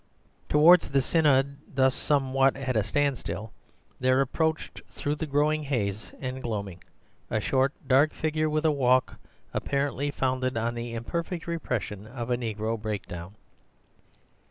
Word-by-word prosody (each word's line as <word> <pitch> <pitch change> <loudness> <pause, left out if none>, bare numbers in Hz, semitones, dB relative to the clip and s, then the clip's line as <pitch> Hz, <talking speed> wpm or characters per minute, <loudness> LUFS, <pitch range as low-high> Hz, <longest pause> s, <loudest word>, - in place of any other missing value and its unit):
Towards 165 +4 +6
the 135 0 +3
synod 140 -3 +3 0.2
thus 130 -1 +4
somewhat 135 -2 +2
at 130 -2 -2
a 110 - +4
standstill 115 -2 -1 0.5
there 130 +1 +3
approached 160 +4 -1
through 145 - -2
the 155 +1 -4
growing 150 +2 +2
haze 110 -8 -2
and 130 0 -4
gloaming 100 -7 -4 0.5
a - - 0
short 130 0 +2
dark 135 +3 +4
figure 155 0 -1
with 155 +1 0
a 155 - +5
walk 130 -3 +2 0.3
apparently 140 0 -1
founded 130 -2 -1
on 115 +1 0
the 120 0 -5
imperfect 170 +8 -4
repression 115 - -3
of 120 +1 -5
a - - +4
negro 110 -2 -3
breakdown. 100 -3 -5
130 Hz, 135 wpm, -27 LUFS, 115-145 Hz, 0.5 s, Towards